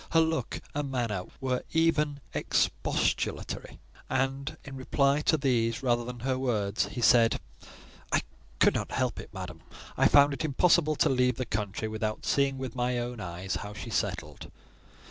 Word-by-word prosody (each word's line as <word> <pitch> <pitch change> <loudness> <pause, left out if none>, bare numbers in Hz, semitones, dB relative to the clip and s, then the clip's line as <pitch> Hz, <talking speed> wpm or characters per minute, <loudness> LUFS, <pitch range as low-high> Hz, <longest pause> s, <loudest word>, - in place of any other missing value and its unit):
Her 165 - +6
look 160 0 0
and 145 -1 -2
manner 115 -8 -2
were 130 -2 -1
even 150 -3 +2
expostulatory; - - -1 0.3
and 135 +3 -1
in 140 -2 -8
reply 140 +2 +2
to 160 - +3
these, 120 -3 +1
rather 120 -2 +2
than 120 0 -7
her 130 0 0
words, 110 -6 0
he 120 - -5
said,—"I 115 0 +1 0.3
could - - +5
not - - -3
help - - 0
it, - - -9
madam: - - -7 0.4
I - - +5
found 145 0 +6
it 140 - -4
impossible 155 +1 +3
to - - +3
leave 125 -2 +2
the 130 - -3
country 105 0 -3
without 110 0 -3
seeing 140 -1 +2
with 130 -3 -5
my 125 0 0
own 120 0 -3
eyes 90 0 -4
how 105 0 -7
she 115 +2 -7
settled." 90 -7 -3
125 Hz, 160 wpm, -29 LUFS, 115-140 Hz, 0.4 s, Her